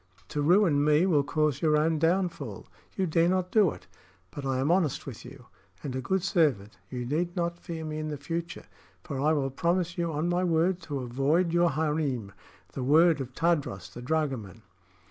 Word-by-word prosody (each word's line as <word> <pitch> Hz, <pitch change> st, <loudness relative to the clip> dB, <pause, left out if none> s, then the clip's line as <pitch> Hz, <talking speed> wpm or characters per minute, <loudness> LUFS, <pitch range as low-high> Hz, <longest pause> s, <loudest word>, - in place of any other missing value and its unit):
To 150 Hz, -, -2 dB
ruin 165 Hz, -2 st, +4 dB
me 150 Hz, +3 st, +4 dB
will 160 Hz, -6 st, +3 dB
cause 150 Hz, -1 st, 0 dB
your 155 Hz, -2 st, +3 dB
own 155 Hz, +1 st, +1 dB
downfall. 165 Hz, -, -1 dB, 0.3 s
You 190 Hz, -, +1 dB
dare 165 Hz, 0 st, +2 dB
not 185 Hz, 0 st, 0 dB
do 210 Hz, -5 st, +5 dB
it. -, -, -9 dB, 0.5 s
But 140 Hz, -2 st, -6 dB
I 135 Hz, -1 st, 0 dB
am 135 Hz, +5 st, +1 dB
honest 175 Hz, -5 st, +1 dB
with 130 Hz, -6 st, -8 dB
you, 125 Hz, 0 st, -12 dB, 0.4 s
and 135 Hz, -3 st, -4 dB
a 130 Hz, -, -2 dB
good 190 Hz, +8 st, -1 dB
servant. 130 Hz, -, +1 dB
You 125 Hz, -1 st, -4 dB
need 170 Hz, +7 st, -1 dB
not 170 Hz, -1 st, -2 dB
fear 165 Hz, -2 st, -6 dB
me 155 Hz, 0 st, -4 dB
in 155 Hz, -, -3 dB
the 150 Hz, -1 st, -4 dB
future, 170 Hz, +4 st, -5 dB, 0.4 s
for 140 Hz, -, -5 dB
I 150 Hz, +2 st, +3 dB
will 135 Hz, -3 st, 0 dB
promise 170 Hz, +4 st, -1 dB
you 170 Hz, -1 st, 0 dB
on 155 Hz, +2 st, -1 dB
my 175 Hz, +1 st, +1 dB
word 175 Hz, +1 st, +2 dB
to 140 Hz, -2 st, -2 dB
avoid 140 Hz, +8 st, +1 dB
your 175 Hz, 0 st, +4 dB
harem 150 Hz, -9 st, -1 dB, 0.4 s
the 135 Hz, -, -4 dB
word 155 Hz, +3 st, +4 dB
of 130 Hz, 0 st, -7 dB
Tadros 145 Hz, -, -1 dB
the 120 Hz, -, -8 dB
dragoman!" 125 Hz, -, -2 dB
155 Hz, 195 wpm, -28 LUFS, 135-170 Hz, 0.5 s, do